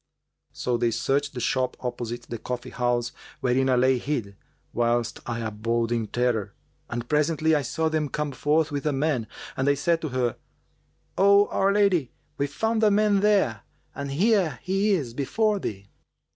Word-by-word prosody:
So 125 -1 -1
they 120 0 +1
searched 140 +5 0
the - - -3
shop 125 +1 0
opposite 120 -1 -4
the 115 -1 -7
coffee 125 +2 -5
house[FN#397] 120 -1 0 0.3
wherein 130 +1 +2
I 130 - +4
lay 130 +1 +3
hid, 115 -8 -3 0.4
whilst 120 0 0
I 120 -1 -3
abode 115 +2 -1
in 115 -2 0
terror; 120 -3 -1 0.3
and 120 0 -4
presently 155 +2 +2
I 150 - +3
saw 160 +5 -1
them 155 -2 0
come 150 0 -2
forth 150 +4 +1
with 145 +1 -2
a 150 - +1
man 135 -5 0 0.3
and 135 - -1
they 140 - +4
said 165 +4 +1
to 155 - -3
her, 125 -2 -1 0.8
'O 200 +1 +6
our 195 +1 +2
lady, 195 -9 +2 0.3
we 140 - +1
found 220 +10 -1
a 215 - +6
man 205 0 +3
there 195 - +2 0.3
and 140 0 -5
here 180 - +2
he 195 +3 +1
is 135 -11 -1
before 205 - 0
thee.' 100 - -5
135 Hz, 170 wpm, -25 LUFS, 120-160 Hz, 0.8 s, O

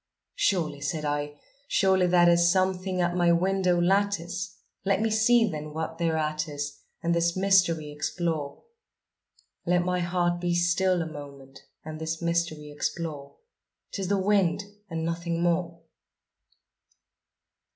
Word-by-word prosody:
"Surely," 160 - 0
said 150 +2 -2
I, 145 0 -3 0.3
"surely 190 -5 +3
that 175 -1 +5
is 170 0 +5
something 185 0 0
at 175 0 0
my 175 -1 +3
window 180 0 +2
lattice; 190 0 0 0.3
Let 195 -1 +1
me 220 0 0
see 225 +1 +4
then, 150 -4 -6
what 160 +1 -4
thereat 155 -1 0
is, 145 -1 -5 0.2
and 170 0 +1
this 170 +1 +1
mystery 180 -6 +3
explore 150 -1 -3 1.0
Let 175 0 +1
my 180 0 0
heart 175 0 0
be 175 -1 0
still 175 +1 +2
a - - -6
moment 140 -3 -11 0.2
and 155 0 -7
this 160 0 -3
mystery 170 -3 -1
explore; 145 -1 -4 0.6
'Tis 195 -2 -3
the 200 +1 +1
wind 195 -1 +2 0.3
and 165 -1 -3
nothing 170 0 -2
more!" 170 -1 -1
170 Hz, 130 wpm, -27 LUFS, 155-185 Hz, 1.0 s, that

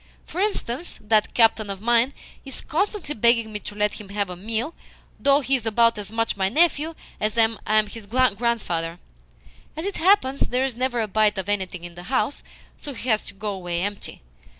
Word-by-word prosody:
For 360 - -4
instance, 350 - -2
that 215 0 +1
captain 225 -3 +4
of 195 -1 -4
mine 240 +4 +2 0.3
is 270 -1 -6
constantly 380 -1 -2
begging 230 -1 +3
me 210 - -3
to 205 - -8
let 210 0 0
him 200 - -12
have 200 -2 -2
a - - -5
meal 225 - -2 0.5
though 280 +1 +4
he 275 0 -1
is 235 -4 -2
about 230 0 +3
as 205 0 -7
much 225 0 0
my 190 -1 +1
nephew 320 - +2 0.2
as 215 +2 -1
I 225 -1 +5 0.2
am 215 0 +4
his 210 0 -10
grandfather. 215 -8 0 0.8
As 320 - -3
it 400 - -3
happens, 320 -7 +3
there 250 +1 +1
is 265 -3 -3
never 245 -1 0
a 220 - -1
bite 210 0 +2
of 190 0 -3
anything 190 -4 -2
in 175 0 -7
the 175 +1 -10
house, 270 +2 0 0.4
so 285 -2 -7
he 250 - -5
has 220 -1 +3
to - - -10
go 205 +1 -3
away 175 -2 -3
empty. 205 - -5
225 Hz, 200 wpm, -24 LUFS, 205-260 Hz, 0.8 s, I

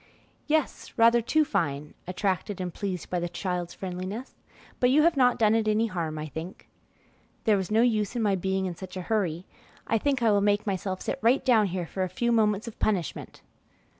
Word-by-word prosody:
"Yes, 310 -1 -1
rather 230 +1 +5
too 310 +7 +2
fine," 150 - -2
attracted 190 +1 -2
and 180 -2 -4
pleased 190 -5 -4
by 180 - 0
the 175 0 -3
child's 180 -1 -3
friendliness; 190 +6 -5 0.5
"but 250 - +4
you 295 +4 +5
have 335 0 +4
not 250 -2 +4
done 215 -1 +4
it 225 -1 +1
any 215 +1 +2
harm, 170 -7 -3
I 155 - -4
think." 160 +5 -8 0.8
"There 215 -3 +4
was 190 -3 -2
no 220 +2 +4
use 220 -2 +1
in 235 - 0
my 205 -2 +2
being 190 +1 -1
in 180 - -3
such 185 +2 -9
a 185 - -4
hurry. 180 -4 -1 0.4
I 225 - +1
think 270 0 0
I 225 - +5
will 205 -1 +3
make 205 +1 +2
myself 190 -1 -2
sit 275 - -3
right 250 +4 +3
down 225 -6 +4
here 180 -2 -3
a 185 - 0
few 235 +6 0
moments 215 -2 +2
for 230 - -5
punishment." 185 -8 -2
205 Hz, 200 wpm, -27 LUFS, 180-230 Hz, 0.8 s, rather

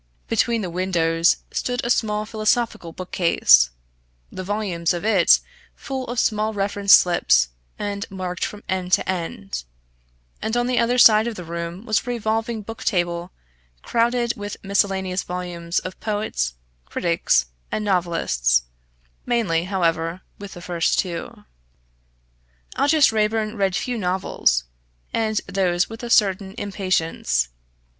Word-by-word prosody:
Between 230 0 +1
the 180 - -3
windows 170 -2 +2
stood 245 0 -2
a 240 - +1
small 210 -2 +1
philosophical 215 -4 0
bookcase, 165 - +4 0.6
the 185 - -6
volumes 185 -4 -1
of 175 - -5
it 200 -6 +5 0.4
full 265 -1 -5
of 245 - -5
small 215 0 +1
reference 200 0 0
slips, 65 - +5 0.3
and 200 -1 -4
marked 185 -2 -4
from 210 - -5
end 185 -1 -2
to - - +3
end; 130 - -4 0.8
and 220 +2 -1
on 240 - +1
the 250 0 +1
other 240 +1 +2
side 220 -2 +7
of 235 - -3
the 180 - -7
room 170 +4 -6
was 215 -3 +2
a - - -12
revolving 225 -1 -1
book 225 +2 -8
table 175 -2 -1 0.5
crowded 235 0 +1
with 205 0 -6
miscellaneous 195 -2 0
volumes 175 -1 -4
of 185 - -3
poets, 205 - -2 0.3
critics, 165 - +1 0.3
and 215 - -2
novelists 165 - +1 0.6
mainly, 200 -9 +1
however, 170 -2 -1 0.2
with 200 -1 -8
the 175 - -10
first 175 -1 0
two. 175 -4 -3 1.3
Aldous 290 -2 +4
Raeburn 215 0 0
read 195 -3 0
few 240 +2 -2
novels, 180 - +1 0.5
and 220 -2 +1
those 185 -1 0
with 225 - -8
a 240 - -5
certain 195 -3 +2
impatience. 165 - -1
195 Hz, 135 wpm, -22 LUFS, 170-220 Hz, 1.3 s, side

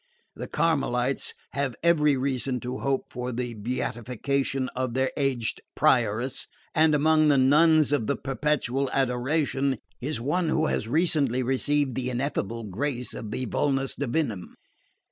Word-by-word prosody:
The - - -6
Carmelites 135 -5 0 0.2
have 140 -2 -2
every 150 -4 +4
reason 130 -1 -1
to 125 +1 -4
hope 135 -1 -1
for 125 0 -4
the 120 0 -3
beatification 130 +4 -2
of 130 -1 -3
their 130 0 +1
aged 135 -5 -1
Prioress, 120 +6 +1 0.3
and 155 -1 +4
among 155 +1 +4
the 145 -2 +4
nuns 150 +3 +5
of 125 -7 +1
the - - +1
Perpetual 135 -1 -1
Adoration 135 +1 0 0.2
is 145 +1 -2
one 155 +7 0
who 155 0 +2
has 110 - -1
recently 140 -3 +2
received 135 +2 +1
the 125 +1 -2
ineffable 120 -3 -2
grace 120 +5 -3
of 110 - -6
the 125 +4 -3
vulnus 135 +3 0
divinum. 125 - -2
135 Hz, 140 wpm, -26 LUFS, 125-145 Hz, 0.3 s, nuns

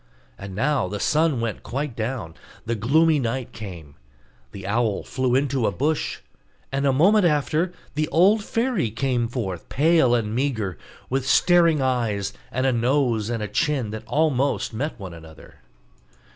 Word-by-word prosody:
And 100 -1 -9
now 135 -1 +1
the 100 +2 -5
sun 155 -3 +2
went 115 -2 -3
quite 135 0 -4
down; 110 -8 -4 0.3
the 115 - -1
gloomy 150 +8 +3
night 125 0 -3
came; 90 -9 -9 0.6
the 95 -1 -9
owl 110 0 0
flew 130 -1 0
into 135 -3 +1
a - - +1
bush; 145 - -1 0.5
and 135 +1 0
a - - +4
moment 190 +10 +4
after 155 +2 +1 0.2
the 155 +1 0
old 200 +6 +4
fairy 230 - 0
came 120 +1 -1
forth 105 -8 -5
pale 150 -4 +3
and 110 -3 -1
meagre, 115 -8 -1 0.4
with 135 0 -1
staring 170 -3 +4
eyes, 115 -6 -1 0.2
and 130 +1 -1
a 130 - +3
nose 120 -2 +1
and 115 -3 -2
chin 145 -8 0
that 110 0 -5
almost 145 -5 +1
met 135 +4 -3
one 95 -3 -7
another. 80 -1 -14
130 Hz, 155 wpm, -23 LUFS, 110-150 Hz, 0.6 s, a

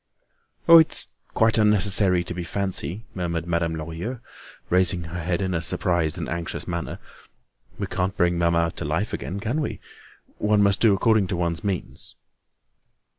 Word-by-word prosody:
"Oh! 165 0 +10
it's 160 - +1 0.3
quite 110 0 +3
unnecessary 100 -3 +3
to 90 - -6
be 90 0 -5
fancy," 95 +1 -2
murmured 85 -3 -3
Madame 85 -1 -1
Lorilleux, 85 +10 -5 0.5
raising 90 -1 +4
her 85 +2 -6
head 85 +3 -1
in 95 -1 -2
a 80 - -1
surprised 85 -1 0
and - - -4
anxious 85 0 -5
manner. 85 -2 -4 0.8
"We - - -2
can't 95 +2 -2
bring 90 -1 +2
mamma 85 -1 +2
to - - -4
life - - -2
again, 95 - -4
can 120 +9 -2
we? 145 - -4 0.6
One 105 -1 +3
must 100 0 +2
do 110 -4 +5
according 110 0 +2
to 90 - -2
one's 85 -1 -2
means." 100 -4 -4
90 Hz, 160 wpm, -24 LUFS, 85-100 Hz, 0.8 s, Oh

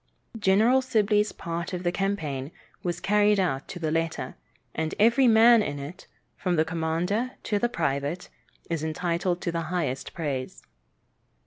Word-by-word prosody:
General 220 +6 +4
Sibley's 210 -4 +2
part 170 +2 -5
of 180 0 -3
the 175 - +1
campaign 160 -8 -2 0.3
was 175 -1 -2
carried 210 0 +3
out 140 -8 -1
to 195 - -7
the 160 -3 -2
letter, 165 0 -2 0.4
and 160 0 -2
every 235 +5 +5
man 230 0 +7
in 175 -9 -3
it, 140 +6 -8 0.3
from 180 -2 -1
the 160 -1 +3
commander 170 +9 -1
to 205 -2 0
the 240 - +1
private, 155 - -2 0.4
is 165 -2 -2
entitled 175 +2 -1
to 170 - -1
the 165 0 -2
highest 155 -7 -2
praise. 140 -6 -4
175 Hz, 150 wpm, -26 LUFS, 160-210 Hz, 0.4 s, man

